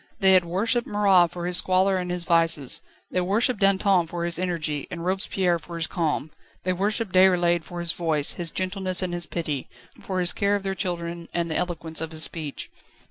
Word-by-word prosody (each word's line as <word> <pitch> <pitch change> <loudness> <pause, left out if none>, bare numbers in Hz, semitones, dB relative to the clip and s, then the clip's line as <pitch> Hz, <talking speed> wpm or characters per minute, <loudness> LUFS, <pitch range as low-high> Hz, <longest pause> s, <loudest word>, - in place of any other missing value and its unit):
They 190 -2 +5
had 185 -2 +5
worshipped 225 +8 0
Marat 195 -4 +4
for 175 0 -6
his 180 0 +2
squalor 190 +1 +3
and 180 -1 -3
his 180 -1 -1
vices; 165 -6 +1 0.3
they 185 - 0
worshipped 210 +5 +1
Danton 195 -3 +3
for 170 +1 -4
his 170 0 -3
energy 160 -5 -2
and 170 -1 -6
Robespierre 185 -2 0
for 170 +2 -10
his 165 -1 +2
calm; 155 -2 -1 0.3
they 185 - 0
worshipped 205 +2 -2
Déroulède 175 -2 +4
for 175 +2 -8
his 170 -1 +2
voice, 160 -5 +1
his 175 -2 -3
gentleness 185 0 -1
and 180 -1 -3
his 175 0 -2
pity, 150 -6 -4 0.3
for 185 -1 -3
his 180 -1 +2
care 200 -1 +1
of 200 - -3
their 195 -1 -2
children 170 -3 -4
and 170 -1 -1
the - - -2
eloquence 165 -3 -3
of 160 - -3
his 160 -1 -1
speech. 150 -2 -2
175 Hz, 200 wpm, -25 LUFS, 170-190 Hz, 0.3 s, They